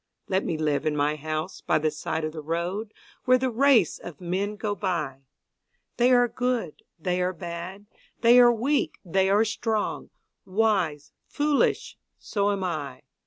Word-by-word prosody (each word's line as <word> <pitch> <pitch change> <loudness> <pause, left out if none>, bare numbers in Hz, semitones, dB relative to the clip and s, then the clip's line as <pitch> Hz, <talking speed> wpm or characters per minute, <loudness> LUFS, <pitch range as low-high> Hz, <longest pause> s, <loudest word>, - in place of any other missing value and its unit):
Let 190 +1 +1
me 165 - -2
live 150 -1 0
in 150 - 0
my 145 +1 +1
house 155 +4 -4
by - - +2
the 155 0 0
side 155 +1 -3
of 155 - -3
the 155 0 -7
road, 175 +7 -3 0.3
Where 255 0 +5
the 255 0 -1
race 240 - +3
of 170 -5 -10
men 190 +4 -2
go 210 0 -2
by 155 -10 -3 0.7
They 245 +1 +4
are 245 -1 +5
good, 245 -9 -2 0.2
they 180 +2 -1
are 180 +1 0
bad, 175 +4 -7 0.4
they 240 +1 +7
are 240 -1 +8
weak, 260 +6 0
they 190 +2 +2
are 205 +3 +4
strong, 220 0 -2 0.3
Wise, 185 -8 0 0.2
foolish 290 -1 0 0.2
so 200 -1 -1
am 200 -1 -2
I. 145 -7 -4
185 Hz, 165 wpm, -26 LUFS, 155-225 Hz, 0.7 s, are